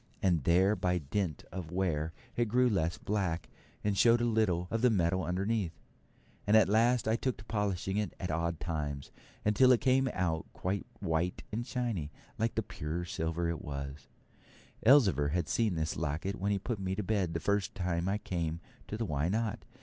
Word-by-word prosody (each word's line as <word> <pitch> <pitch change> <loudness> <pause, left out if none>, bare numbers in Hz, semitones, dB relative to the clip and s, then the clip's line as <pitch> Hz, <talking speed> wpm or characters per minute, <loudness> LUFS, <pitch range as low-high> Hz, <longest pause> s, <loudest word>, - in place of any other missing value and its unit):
And 85 -8 +2
there 95 +5 +4
by 90 -2 +1
dint 80 +1 -2
of 90 -3 -5
wear 85 -3 -1 0.2
it 120 - +2
grew 125 +3 +3
less 85 -5 0
black, 95 -5 -1 0.4
and 105 -1 +1
showed 115 +3 +5
a 120 - +1
little 105 -7 +1
of 115 - 0
the 125 - +5
metal 95 -3 +2
underneath, 95 -1 -1 0.7
and 105 +2 +6
at 110 - +6
last 115 +3 +3
I 110 - +3
took 130 +1 -1
to 105 - -11
polishing 100 -3 -1
it 105 -4 -2
at 90 - -3
odd 85 +1 -1
times, 75 -4 -3 0.3
until 105 +5 +5
it 125 - +5
came 130 0 +3
out 80 -3 -1
quite 95 +2 -2
white 85 +2 -1
and 120 +3 -3
shiny, 115 - -2 0.3
like 115 +1 0
the 110 - 0
pure 85 -1 -4
silver 80 0 -2
that 85 - +1
it 85 -2 -3
was. 70 -1 -6 0.8
Elzevir 100 - +5
had 85 -3 0
seen 110 -6 +1
this 80 0 -1
locket 80 +5 -2
when 100 +2 0
he 100 - +2
put 105 +2 -3
me 95 0 -2
to 105 - -2
bed 95 -4 0
the - - +1
first 100 +4 0
time 90 -1 -1
I 100 - +1
came 85 -5 -3 0.3
to 105 - -4
the 115 - -1
Why 75 -2 0
Not? 110 +2 -1
95 Hz, 195 wpm, -32 LUFS, 85-110 Hz, 0.8 s, and